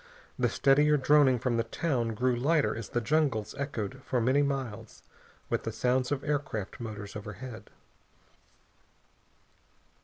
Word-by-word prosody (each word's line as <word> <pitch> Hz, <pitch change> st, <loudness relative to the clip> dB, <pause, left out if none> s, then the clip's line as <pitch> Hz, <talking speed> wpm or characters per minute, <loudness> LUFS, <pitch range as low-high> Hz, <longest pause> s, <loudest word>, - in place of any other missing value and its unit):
The -, -, +3 dB
steadier 150 Hz, +2 st, +4 dB
droning 140 Hz, -1 st, +5 dB
from 120 Hz, 0 st, 0 dB
the 115 Hz, -, +2 dB
town 120 Hz, -2 st, -1 dB
grew 125 Hz, +2 st, +1 dB
lighter 145 Hz, +5 st, +2 dB
as 115 Hz, -, -6 dB
the 120 Hz, -, -1 dB
jungles 135 Hz, -5 st, +1 dB
echoed 130 Hz, -3 st, -4 dB
for 125 Hz, -, 0 dB
many 130 Hz, +5 st, +3 dB
miles 125 Hz, -6 st, -3 dB, 0.4 s
with -, -, -1 dB
the 115 Hz, -, -4 dB
sounds 125 Hz, +3 st, 0 dB
of 140 Hz, -2 st, -1 dB
aircraft 145 Hz, -9 st, -3 dB
motors 105 Hz, -3 st, -7 dB
overhead. 110 Hz, +2 st, -8 dB
125 Hz, 130 wpm, -29 LUFS, 115-140 Hz, 0.4 s, droning